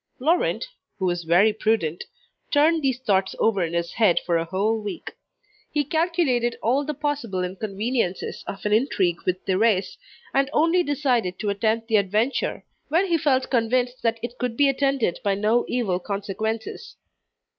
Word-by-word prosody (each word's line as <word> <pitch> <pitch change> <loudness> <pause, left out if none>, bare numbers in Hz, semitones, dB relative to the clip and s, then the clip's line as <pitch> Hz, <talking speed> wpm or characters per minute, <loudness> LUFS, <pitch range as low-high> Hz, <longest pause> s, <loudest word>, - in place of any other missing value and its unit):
Laurent, 335 - +1 0.3
who 190 - -2
was 175 -1 -1
very 185 +6 +4
prudent, 210 -7 0 0.4
turned 315 +2 +3
these 265 -4 +1
thoughts 195 -6 0
over 200 -5 +2
in 165 0 -3
his 170 0 -2
head 215 -7 +3
for 175 - +1
a 165 0 +1
whole 205 +6 0
week. 205 - -6 0.6
He 295 -1 +1
calculated 300 -6 0
all 260 +5 +2
the 300 +1 -4
possible 255 -11 -2
inconveniences 195 +2 -3
of 195 - -7
an 210 - +1
intrigue 195 -7 +1
with 185 0 -1
Thérèse, 195 0 +1 0.4
and 275 0 +2
only 330 +4 +3
decided 255 - 0
to 210 -2 -1
attempt 220 +3 0
the 220 -2 +3
adventure, 210 +6 0 0.2
when 340 +5 +2
he 335 - +3
felt 265 -4 +1
convinced 245 +1 +1
that 230 0 0
it 240 +1 -6
could 245 -2 -2
be 285 - +5
attended 275 -8 0
by 200 -1 +1
no 215 +4 +2
evil 210 -8 0
consequences. 205 +3 -4
225 Hz, 160 wpm, -24 LUFS, 195-270 Hz, 0.6 s, be